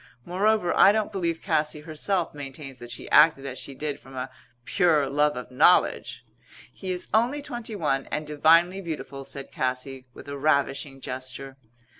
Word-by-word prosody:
Moreover, 195 +1 +1
I 195 - +7
don't 215 0 -1
believe 170 -4 -2
Cassy 150 0 0
herself 165 +4 -1
maintains 135 -2 -8
that 120 - -10
she 120 - -8
acted 150 -3 +6
as 130 -1 -5
she 135 - -8
did 145 +1 -4
from 135 0 -14
a 125 - -4 0.3
pure 160 -7 +3
love 145 +1 +1
of 125 0 -7
knowledge." 150 +8 +3 0.5
"He 190 -2 -5
is 180 0 -3
only 245 +7 +2
twenty 240 -5 -6
one 145 -7 -1
and 150 - -3
divinely 165 +5 +4
beautiful," 145 -5 -6
said 140 0 -7
Cassy, 130 0 -3
with - - -13
a 140 0 -6
ravishing 140 -2 0
gesture. 130 +1 -6
150 Hz, 165 wpm, -26 LUFS, 135-180 Hz, 0.5 s, I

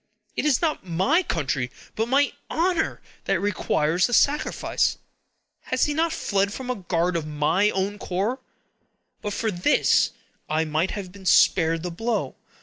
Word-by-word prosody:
"It - - -1
is 290 +1 +2
not 315 -2 0
my 190 - +2
country, 140 - -2 0.3
but 225 +1 0
my 280 +3 +2 0.2
honor, 340 0 0 0.2
that - - +1
requires 180 -4 +1
the 245 - +1
sacrifice. 290 +1 +1 0.7
Has - - +1
he 295 - -1
not 325 +2 +1
fled 200 -7 0
from 255 +3 -4
a - - -2
guard 180 -3 -1
of 160 -2 -2
my 155 +7 +2
own 200 +1 -2
corps? 200 +8 -2 0.8
But 205 - -3
for 220 +1 -1
this, 180 +10 +3 0.4
I 155 +1 +1
might 155 +4 0
have 195 -3 -6
been 190 -1 -9
spared 165 -2 +4
the 180 - -3
blow! 225 +6 -2
195 Hz, 155 wpm, -24 LUFS, 170-250 Hz, 0.8 s, spared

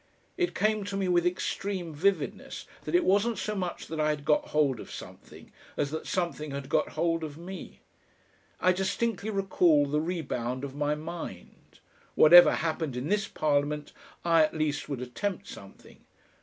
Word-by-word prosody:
It 355 -1 -1
came 215 0 +1
to 200 -1 -3
me 195 -1 0
with 175 -1 +3
extreme 180 -1 -3
vividness 190 +6 -1 0.2
that - - -1
it 355 - +4
wasn't 205 +4 +2
so 215 - -2
much 185 -4 -4
that 160 0 -6
I 155 0 +2
had 150 -1 -2
got 150 0 +2
hold 140 -5 +1
of - - -9
something - - -11 0.3
as 145 -1 0
that 160 - -5
something 170 -4 -2
had 140 -1 -6
got - - +1
hold 165 0 +1
of 150 -1 -6
me. 180 +3 -9 0.8
I 185 - +4
distinctly 195 +3 -1
recall 180 -7 +3
the 150 +2 0
rebound 135 -7 -3
of 140 -1 -5
my 145 +1 0
mind. 155 - -9 0.4
Whatever 175 +3 +9
happened 160 -5 -2
in 130 +5 -3
this 210 +1 +1
Parliament, 150 0 -1 0.3
I 165 -1 +5
at 155 - +2
least 150 -1 -1
would 135 -4 -3
attempt 185 +11 -4
something. 100 0 -13
165 Hz, 170 wpm, -28 LUFS, 145-190 Hz, 0.8 s, Whatever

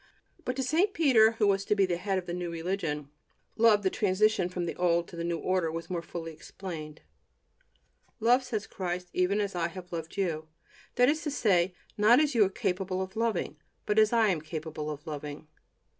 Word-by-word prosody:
But 250 - -1
to 265 - -1
St. 345 +10 +1
Peter, 235 - +5
who 225 -1 +1
was 195 -1 +2
to 210 - +2
be 200 -1 +4
the 175 -2 -1
head 190 +2 -1
of 185 - -3
the 175 - -4
new 175 -1 -3
religion, 165 -4 -3 0.5
love 220 -2 +5
the 190 - +2
transition 200 -1 +2
from 180 -1 -3
the 170 - -4
old 170 -1 +2
to - - -10
the 170 - -4
new 170 0 -1
order 180 -2 0
was 165 +3 -6
more 175 -2 -1
fully 165 -1 -7
explained: 155 -3 -8 1.2
"Love," 245 +3 +4
said 230 -5 -4
Christ, 180 -1 -4
"even 185 +3 +1
as 200 -1 -1
I 170 -2 0
have 180 0 -10
loved 165 +2 -5
you," 160 -5 -1 0.5
that 245 - +5
is 310 +3 +2
to 310 - -2
say, 185 -9 +2 0.2
not 220 +5 +6
as 300 -1 +2
you 225 -3 +5
are 190 - +2
capable 190 -2 -2
of 190 0 -4
loving, 220 -8 -1 0.3
but 210 +1 +2
as 215 -1 +5
I 225 -2 +4
am 170 -5 0
capable 155 -1 -5
of 150 +1 -7
loving. 150 -1 -6
185 Hz, 205 wpm, -29 LUFS, 170-215 Hz, 1.2 s, not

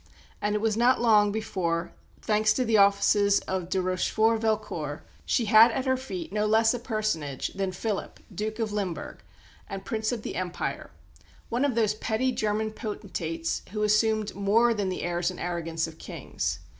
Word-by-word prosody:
And 210 0 0
it 210 - 0
was 220 -1 +1
not 245 +3 +4
long 210 -3 +4
before, 180 -6 -2 0.3
thanks 215 0 +3
to 255 +3 0
the 225 -1 +2
offices 200 0 +4
of 185 -2 -3
de 190 - +1
Rochefort 220 +5 +1
Velcourt, 210 -10 -2 0.2
she 235 - +2
had 220 +2 +8
at 260 - -2
her 260 0 +2
feet 320 +6 -6
no 210 0 +1
less 225 +2 +4
a 245 - -3
personage 215 - -2
than 195 -1 -3
Philip, 205 +3 -4
Duke 215 +3 -3
of 225 -2 -2
Limburg, 200 -5 -4 0.5
and 195 -1 -6
Prince 220 0 -1
of 230 -3 -4
the - - -5
Empire, 180 -1 -3 0.6
one 240 +3 0
of 280 -5 +1
those 220 -3 +2
petty 220 +4 -1
German 215 -2 -1
potentates 180 -7 -4
who 210 -1 -1
assumed 215 0 +2
more 220 +4 +3
than 205 -3 -1
the 185 - -4
airs 175 0 0
and 185 - -7
arrogance 165 -2 -2
of 160 -1 -10
kings. - - -4
210 Hz, 175 wpm, -27 LUFS, 185-225 Hz, 0.6 s, had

